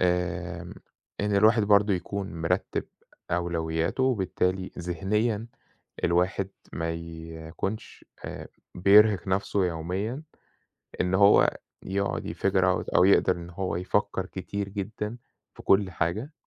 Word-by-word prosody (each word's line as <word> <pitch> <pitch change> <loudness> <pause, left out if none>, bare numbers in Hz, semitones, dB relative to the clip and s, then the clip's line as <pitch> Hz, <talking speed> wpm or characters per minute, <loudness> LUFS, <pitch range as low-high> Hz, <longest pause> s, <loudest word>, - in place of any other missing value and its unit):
آمم، 90 -1 -1 0.5
إن 105 0 +1
الواحد 110 +2 +5
برضه 100 0 +4
يكون 95 +1 -4
مرتب 80 0 -1 0.5
أولوياته، 85 +3 -1
وبالتالي 95 -6 0
ذهنيًا 105 +6 -1 0.6
الواحد 90 +3 +1 0.2
ما 80 0 -2
يكونش 80 +5 -6 0.2
آآ، - - -7 0.3
بيرهق 100 +1 +5
نفسه 95 0 +1
يوميًا، 95 - -3 0.8
إن 90 0 0
هو 100 +1 +5 0.3
يقعد 100 +1 -2
يfigure 95 -1 +1
out 95 -1 0
أو - - +6
يقدر 95 -1 +5
إن 85 0 -8
هو 90 0 -3
يفكر 95 +1 0
كتير 100 +2 -5
جدًا 105 +3 -4 0.4
في - - -13
كل 95 -1 +3
حاجة. 90 - -2
95 Hz, 115 wpm, -27 LUFS, 85-100 Hz, 0.8 s, أو